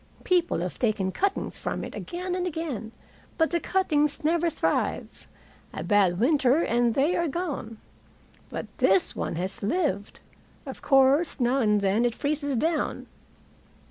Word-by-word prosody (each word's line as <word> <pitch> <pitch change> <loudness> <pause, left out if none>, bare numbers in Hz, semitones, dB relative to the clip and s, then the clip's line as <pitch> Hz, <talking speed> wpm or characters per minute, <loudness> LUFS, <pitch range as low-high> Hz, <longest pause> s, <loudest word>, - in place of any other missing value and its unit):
People 355 -2 +2
have 180 0 -5
taken 210 -5 0
cuttings 395 - -2
from - - -3
it - - -7
again 360 0 -5
and 360 0 -1
again, 295 - -4 0.5
but 320 -1 +2
the 340 - +1
cuttings 310 -5 0
never 335 +2 +2
thrive. 315 - -2 0.5
A - - -4
bad 190 -4 +2
winter, 280 +3 +3
and 235 0 +1
they 290 +6 +2
are 340 - 0
gone. 290 -9 -4 0.7
But - - -5
this 195 -8 +3
one - - -3
has 185 +3 -3
lived. 205 - -1 0.5
Of - - -8
course 275 +4 +3
now 250 +2 +2
and 210 -4 +2
then 200 +4 +2
it 240 -1 0
freezes 285 -1 -1
down." 315 +5 -1
280 Hz, 145 wpm, -26 LUFS, 220-335 Hz, 0.7 s, winter